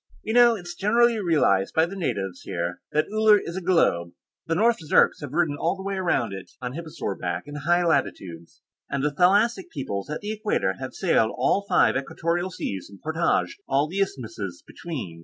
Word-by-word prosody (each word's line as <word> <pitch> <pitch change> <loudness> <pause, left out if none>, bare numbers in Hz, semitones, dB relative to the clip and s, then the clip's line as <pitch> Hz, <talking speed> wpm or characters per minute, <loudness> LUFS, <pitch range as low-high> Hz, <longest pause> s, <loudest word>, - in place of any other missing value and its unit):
You - - -3
know, 240 -1 +6
it's 175 -4 -7
generally 230 +5 +3
realized 145 - +2
by 160 - +4
the 185 +3 -8
natives 95 - -3
here 85 0 -4
that 155 - +2
Uller 215 -1 +6
is 170 - -7
a 190 - -3
globe. 90 - +2 0.3
The 165 - 0
North 230 +5 +3
Zirks 150 - +3
have - - -6
ridden 160 -2 +1
all 170 - +1
the 190 - -9
way 195 0 -3
around 175 - 0
it, 95 -1 -8
on 125 -1 -5
hipposaur 155 -10 -5
back, 90 0 -3
in 145 - -10
the 145 - -5
high 175 +4 +2
latitudes, 95 - -2 0.3
and 140 0 -2
the 150 - +1
thalassic 205 - +3
peoples 100 - -5
at 150 - -4
the 210 +1 -4
Equator 215 0 0
have - - -6
sailed - - +2
all 200 - +2
the 200 - -21
five 180 - +4
equatorial 170 +6 -1
seas 100 - -5
and 100 -1 -14
portaged 165 +4 0
all 140 +2 +2
the 185 +5 -4
isthmuses 110 - -4
between. 125 - -7
165 Hz, 200 wpm, -25 LUFS, 115-190 Hz, 0.3 s, know